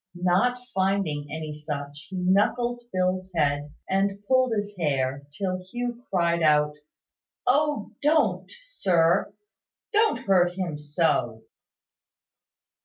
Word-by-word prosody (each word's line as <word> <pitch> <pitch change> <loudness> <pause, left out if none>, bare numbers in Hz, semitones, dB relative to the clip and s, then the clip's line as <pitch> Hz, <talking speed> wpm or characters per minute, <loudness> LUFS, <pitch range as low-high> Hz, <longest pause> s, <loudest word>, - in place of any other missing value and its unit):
Not 180 +8 +2 0.2
finding 190 -6 0
any 155 -1 -5
such, 150 -1 -6
he 190 - -7
knuckled 210 +7 +1
Phil's 185 0 -1
head, 145 -1 0 0.2
and 195 +1 0
pulled 255 -1 +3
his 205 -1 -2
hair, 140 -4 -1
till 185 +3 -3
Hugh 240 +5 -5
cried 170 -2 +1
out 150 -1 +4 0.7
"O, 290 -3 +1
don't, 305 +2 +2
sir! 185 - +2 0.6
Don't 435 +1 +3
hurt 180 -2 +4
him 175 -5 -3
so!" 145 -7 0
185 Hz, 105 wpm, -26 LUFS, 150-205 Hz, 0.7 s, out